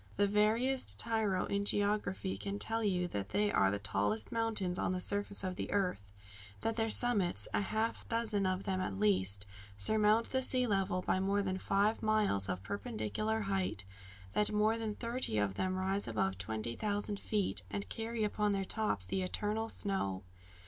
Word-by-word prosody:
The 205 Hz, -, +3 dB
veriest 220 Hz, +6 st, +2 dB
tyro 220 Hz, -5 st, +1 dB
in 200 Hz, 0 st, -1 dB
geography 205 Hz, -2 st, 0 dB
can 200 Hz, 0 st, -4 dB
tell 225 Hz, +2 st, +3 dB
you 180 Hz, -4 st, 0 dB
that 100 Hz, -, -4 dB
they 205 Hz, -, +1 dB
are 95 Hz, 0 st, +3 dB
the 100 Hz, -, -1 dB
tallest 105 Hz, +1 st, -1 dB
mountains 215 Hz, -6 st, -1 dB
on -, -, 0 dB
the 185 Hz, -, -2 dB
surface 200 Hz, +1 st, +2 dB
of 185 Hz, -1 st, -4 dB
the -, -, -4 dB
earth; 190 Hz, -, 0 dB, 0.6 s
that 225 Hz, -, -1 dB
their 225 Hz, -1 st, 0 dB
summits 215 Hz, -6 st, +4 dB
a -, -, +1 dB
half 220 Hz, +3 st, -2 dB
dozen 220 Hz, -4 st, 0 dB
of 185 Hz, +1 st, -2 dB
them 190 Hz, -2 st, -2 dB
at 95 Hz, -, -3 dB
least 100 Hz, -1 st, +3 dB, 0.3 s
surmount 215 Hz, -, +3 dB
the 260 Hz, -, +1 dB
sea 255 Hz, -1 st, +5 dB
level 195 Hz, -4 st, 0 dB
by 185 Hz, -, 0 dB
more 200 Hz, +1 st, 0 dB
than 190 Hz, -1 st, -2 dB
five 205 Hz, +3 st, +1 dB
miles 210 Hz, -, +1 dB
of 90 Hz, 0 st, -3 dB
perpendicular 110 Hz, -, -3 dB
height; 195 Hz, -, -2 dB, 0.5 s
that 210 Hz, -, +2 dB
more 215 Hz, +1 st, +2 dB
than 220 Hz, -2 st, -3 dB
thirty 235 Hz, -, -2 dB
of 105 Hz, -2 st, 0 dB
them 185 Hz, -, -2 dB
rise 190 Hz, +2 st, -1 dB
above 95 Hz, -4 st, -1 dB
twenty 110 Hz, +4 st, -4 dB
thousand 205 Hz, -, -1 dB
feet, 205 Hz, -3 st, +1 dB
and 200 Hz, -, -5 dB
carry 225 Hz, 0 st, -3 dB
upon 210 Hz, 0 st, 0 dB
their 195 Hz, -1 st, -2 dB
tops 185 Hz, -, -1 dB
the 190 Hz, -, -2 dB
eternal 210 Hz, +4 st, -2 dB
snow! 100 Hz, -, -1 dB
200 Hz, 175 wpm, -33 LUFS, 175-215 Hz, 0.6 s, sea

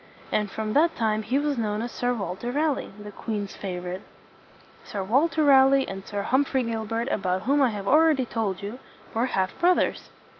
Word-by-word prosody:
And 210 Hz, -1 st, 0 dB
from 215 Hz, +1 st, -3 dB
that 325 Hz, +3 st, +3 dB
time 215 Hz, -1 st, 0 dB
he 240 Hz, +5 st, 0 dB
was 290 Hz, -3 st, 0 dB
known 215 Hz, 0 st, -1 dB
as 240 Hz, -, -5 dB
Sir 245 Hz, 0 st, -1 dB
Walter 205 Hz, +1 st, -3 dB
Raleigh, 295 Hz, +1 st, 0 dB
the 210 Hz, 0 st, -9 dB
queen's 205 Hz, -1 st, -4 dB
favorite. 180 Hz, -1 st, -5 dB, 0.8 s
Sir 200 Hz, -2 st, -4 dB
Walter 295 Hz, -, +2 dB
Raleigh 270 Hz, -1 st, +5 dB
and 195 Hz, 0 st, -6 dB
Sir 205 Hz, -1 st, -3 dB
Humphrey 265 Hz, 0 st, +1 dB
Gilbert 225 Hz, 0 st, -2 dB
about 185 Hz, -2 st, -1 dB
whom 280 Hz, +4 st, +2 dB
I 265 Hz, -, +4 dB
have 205 Hz, -3 st, -5 dB
already 305 Hz, -2 st, +4 dB
told 205 Hz, -5 st, -3 dB
you, 215 Hz, +6 st, -6 dB, 0.3 s
were 230 Hz, +3 st, +1 dB
half 190 Hz, -6 st, 0 dB
broth 360 Hz, +1 st, +4 dB
ers. -, -, -1 dB
225 Hz, 185 wpm, -25 LUFS, 205-270 Hz, 0.8 s, Raleigh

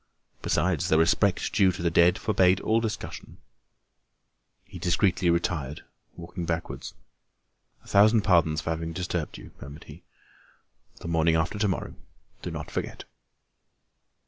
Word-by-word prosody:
Besides, 90 Hz, -5 st, 0 dB
the 80 Hz, -, +4 dB
respect 90 Hz, +4 st, +2 dB
due 95 Hz, -3 st, +4 dB
to 85 Hz, -, -6 dB
the 85 Hz, -, +1 dB
dead 85 Hz, +2 st, +4 dB
forbade 95 Hz, -3 st, +3 dB
all 110 Hz, +1 st, +2 dB
discussion. 110 Hz, -2 st, -6 dB, 1.3 s
He -, -, -11 dB
discreetly 90 Hz, 0 st, +1 dB
retired, 80 Hz, -4 st, -1 dB, 0.3 s
walking 85 Hz, +1 st, -7 dB
backwards. 85 Hz, 0 st, -4 dB, 0.9 s
"A -, -, -20 dB
thousand 105 Hz, +2 st, +5 dB
pardons 80 Hz, -5 st, +3 dB
for 80 Hz, -, -3 dB
having 80 Hz, 0 st, -4 dB
disturbed 90 Hz, -2 st, -3 dB
you," -, -, -12 dB
murmured 70 Hz, +3 st, -10 dB
he. 75 Hz, +4 st, -13 dB, 1.0 s
"The -, -, -7 dB
morning 80 Hz, -1 st, +2 dB
after 85 Hz, +5 st, -1 dB
to 105 Hz, -, +2 dB
morrow; 95 Hz, -, -3 dB, 0.5 s
do -, -, -5 dB
not -, -, -7 dB
forget." -, -, -4 dB
85 Hz, 135 wpm, -26 LUFS, 80-95 Hz, 1.3 s, thousand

